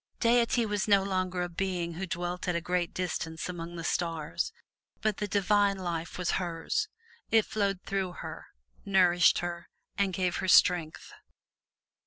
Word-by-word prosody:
Deity 235 0 +3
was 205 -1 -1
no 200 -2 +5
longer 185 -2 -1
a - - -2
Being 175 -1 -2
who 185 +3 -4
dwelt 175 +1 -3
at 180 - +1
a - - +2
great 175 0 -1
distance 165 -3 -3
among 175 -1 -6
the 165 - -5
stars, 165 - -1 0.5
but 215 -2 0
the 210 - -2
Divine 200 0 +2
Life 170 -3 -4
was 180 -1 0
hers. 175 - -1 0.4
It 225 -1 +4
flowed 200 -3 -1
through 190 -2 -2
her, - - -8 0.4
nourished 180 -3 +4
her 170 0 -6 0.3
and 200 -1 +2
gave 180 -1 0
her - - -2
strength. 175 -3 +3
180 Hz, 155 wpm, -29 LUFS, 175-195 Hz, 0.5 s, no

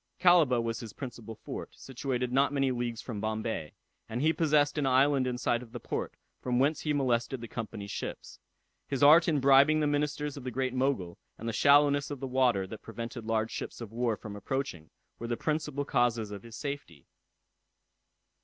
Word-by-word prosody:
Calaba 170 -9 +5
was 115 0 -2
his 115 -3 -8
principal 120 -4 -8
fort, - - -8
situated 125 -1 -3
not 140 +2 +3
many 135 -2 +1
leagues 120 -2 -3
from 110 -5 -5
Bombay, 110 -7 -3 0.4
and 115 - -3
he 155 +4 +3
possessed 150 -2 +2
an 140 - +1
island 135 0 +3
in 125 -1 -2
sight 120 -1 0
of 120 -2 -13
the 120 - -5
port, - - -4 0.3
from 125 -1 0
whence 145 +5 +2
he 150 - -1
molested 130 -2 0
the 115 - -7
Company's 110 -3 -6
ships. - - -6 0.5
His 135 -1 -1
art 160 +4 +8
in 155 -4 +2
bribing 140 +3 +6
the 155 - +1
ministers 145 0 -1
of 140 - -8
the 130 - -3
Great 130 +1 -2
Mogul, 130 -10 -1 0.2
and 115 - -7
the 115 - -2
shallowness 145 +2 +4
of 145 -2 -5
the 135 - -4
water, 125 -7 +2
that 105 +3 -9
prevented 115 +1 -7
large 110 0 0
ships - - -6
of 115 -3 -7
war 115 -1 0
from 105 -2 -8
approaching, 105 - -4 0.3
were 115 - -5
the 120 0 -2
principal 150 -2 -2
causes 120 -5 +1
of 100 -1 -7
his 115 0 -11
safety. 140 - -6
125 Hz, 190 wpm, -30 LUFS, 115-145 Hz, 0.5 s, art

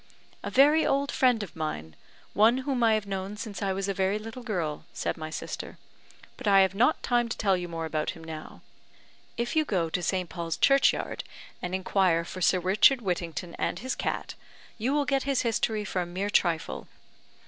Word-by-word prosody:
"A - - -4
very 295 +4 +5
old 280 +1 +1
friend 250 -4 +3
of 195 - -9
mine, 80 - -4 0.4
one 220 +5 +5
whom 265 -4 0
I 225 -1 +5
have 215 -1 -2
known 195 +1 -4
since 210 -2 -6
I 195 -1 0
was 195 +1 -2
a 195 - 0
very 190 +2 +1
little 225 +3 -8
girl," 175 -10 -3
said - - -2
my 155 -1 -6
sister; - - -6 0.6
"but - - -6
I 195 -1 +7
have 190 -1 +3
not 230 +6 +2
time 240 -1 +1
to - - -4
tell 195 -3 +2
you 180 -1 -3
more 165 -1 -4
about 155 -1 -2
him 165 -3 -7
now. 160 -1 -8 0.8
If 240 +5 -2
you 315 - +4
so 170 -5 0
to 180 - -1
St. 185 0 -1
Paul's 170 -2 -4
Churchyard, 275 0 +3 0.4
and 180 +1 -2
inquire 185 -3 +2
for 185 - -7
Sir 185 - +4
Richard 205 +8 +4
Whittington 175 -2 -3
and - - -1
his 255 +7 -3
cat, - - -3 0.5
you 240 +5 0
will 290 0 +2
get 275 0 +1
his 275 - +2
history 220 -2 0
for 185 -2 -1
a 175 - -3
mere 190 +4 -3
trifle." 165 - 0
195 Hz, 200 wpm, -28 LUFS, 175-235 Hz, 0.8 s, I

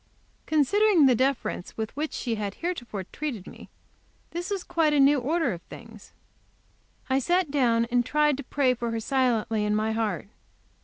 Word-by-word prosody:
Considering 330 +3 +4
the 260 - +6
deference 240 -7 -1
with 220 +2 -4
which 300 +2 -2
she 240 - -3
had 205 -2 -3
heretofore 245 - -4
treated 235 -1 -5
me, - - -12 0.6
this 350 +2 -4
was 395 -3 -2
quite 330 -3 +1
a 290 - +3
new 275 +1 +5
order 315 - 0
of 170 - -8
things. 225 -3 -12 1.0
I 265 0 +2
sat 350 +2 +1
down 235 -5 +2
and 245 0 +3
tried 300 +2 +2
to 285 - -6
pray 260 0 +1
for 235 -1 -4
her, 230 0 -2
silently, 230 -3 0
in 210 0 +1
my 215 +1 0
heart. 215 -4 -2
255 Hz, 170 wpm, -26 LUFS, 225-300 Hz, 1.0 s, the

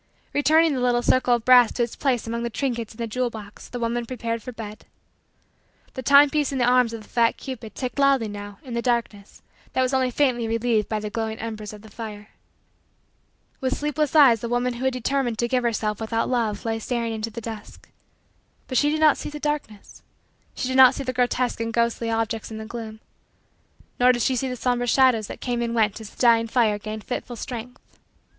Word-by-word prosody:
Returning 310 +2 +4
the 260 - -1
little 245 -1 +2
circle 250 -1 +3
of 235 - -5
brass 250 -2 +6
to 240 - 0
its 235 - -4
place 255 -6 0
among 230 +1 -3
the 235 - -2
trinkets 235 -3 -3
in - - -18
the 235 - -2
jewel 245 +2 -1
box, 210 -3 -11
the 245 - -5
woman 235 0 -2
prepared 230 -2 -3
for 250 - -7
bed. 220 -2 -9 1.1
The 260 - -5
timepiece 285 +2 +5
in 275 - -2
the 245 - +2
arms 250 -1 +4
of 225 -1 -7
the - - -18
fat 230 -1 +2
cupid 250 -5 -8
ticked 255 +1 -4
loudly 275 -5 +3
now 205 -1 -8
in 255 -4 -8
the 235 - -1
darkness 235 -5 -2 0.3
that 260 - +2
was 255 +1 -1
only 260 -1 +2
faintly 250 -3 +1
relieved 225 -1 0
by 215 - -1
the 210 0 -5
glowing 220 -1 -3
embers 215 -2 -6
of 210 0 -12
the 220 - -14
fire. 210 -2 -8 1.3
With 260 -1 -1
sleepless 300 0 -1
eyes 265 -7 +7
the 235 - -4
woman 245 +1 0
who 245 +2 -5
had 265 - +2
determined 255 -1 -1
to 235 - 0
give 250 +1 +1
herself 215 -2 -1
without 225 +1 -1
love 230 -5 -1
lay 225 0 -1
staring 230 0 -2
into 220 0 -3
the 230 +1 -7
dusk. 220 -2 -9 0.8
But 255 - +1
she 295 - +3
did 310 +1 -1
not 305 -2 +5
see - - -5
the 295 0 -7
darkness. 295 -9 -4 0.5
She - - -2
did 260 0 -1
not 260 0 +8
see - - -4
the 255 -1 -3
grotesque 245 0 0
and 230 0 -2
ghostly 235 0 0
objects 225 0 -2
in 220 - -7
the 220 - -6
gloom. 220 -1 -8 1.0
Nor 250 +1 +6
did 240 -2 -1
she 260 - +1
see 260 +2 -1
the 250 - -3
somber 245 0 -1
shadows 245 -4 +3
that - - -9
came 240 -1 -2
and 235 0 -2
went 220 -1 +1
as 215 - -9
the - - -21
dying 230 -2 +4
fire 225 -3 +2
gained 215 0 -6
fitful 245 -1 -5
strength. 245 +1 -9
235 Hz, 220 wpm, -24 LUFS, 225-255 Hz, 1.3 s, not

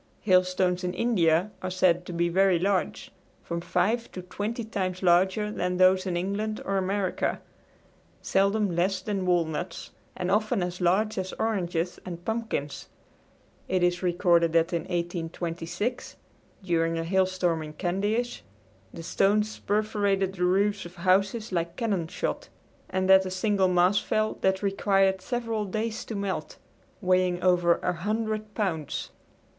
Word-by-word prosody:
Hailstones 185 -1 +2
in 180 0 -2
India 180 -4 +2
are 185 - -3
said 180 -1 +2
to - - -5
be 170 0 +1
very 190 +1 +3
large 190 +2 -1 0.3
from 170 0 -4
five 185 +7 0
to 185 - -6
twenty 210 +6 -4
times 190 -4 -3
larger 190 +4 +3
than 180 -3 -2
those 185 +1 +4
in 175 -2 -1
England 205 +4 -2
or 195 0 0
America 190 0 -1 0.8
seldom 200 -1 +1
less 185 +2 +1
than 190 -1 -3
walnuts 170 0 -1 0.3
and 180 +1 -2
often 215 0 +1
as 180 +1 -5
large 195 +4 +2
as 190 0 -4
oranges 180 -5 -2
and 175 -1 -8
pumpkins. 220 -11 -3 0.8
It 185 -1 +1
is 175 0 +1
recorded 175 -2 +2
that 165 +1 +2
in 170 - -1
1826, 175 +4 -3 0.5
during 165 -2 +1
a 165 - -1
hailstorm 185 -2 +1
at 155 -1 -9
Candeish, 205 +7 -1 0.5
the 165 - -9
stones 210 +5 +1
perforated 205 -2 0
the 180 -2 -1
roofs 200 +2 +2
of 175 +1 -11
houses 195 +5 +1
like 170 -1 -2
cannon 200 -9 -1
shot, - - -4 0.4
and 185 0 0
that 190 0 +7
a 185 - -4
single 190 +1 +1
mass 180 +2 +3
fell 215 0 -1
that 190 +1 +1
required 195 -1 +2
several 230 -1 -2
days 220 +3 -3
to 225 - -6
melt, 200 -1 -3 0.5
weighing 185 -1 +2
over 175 -2 +4
100 215 +4 -2
pounds. 165 -9 -2
185 Hz, 140 wpm, -27 LUFS, 175-205 Hz, 0.8 s, that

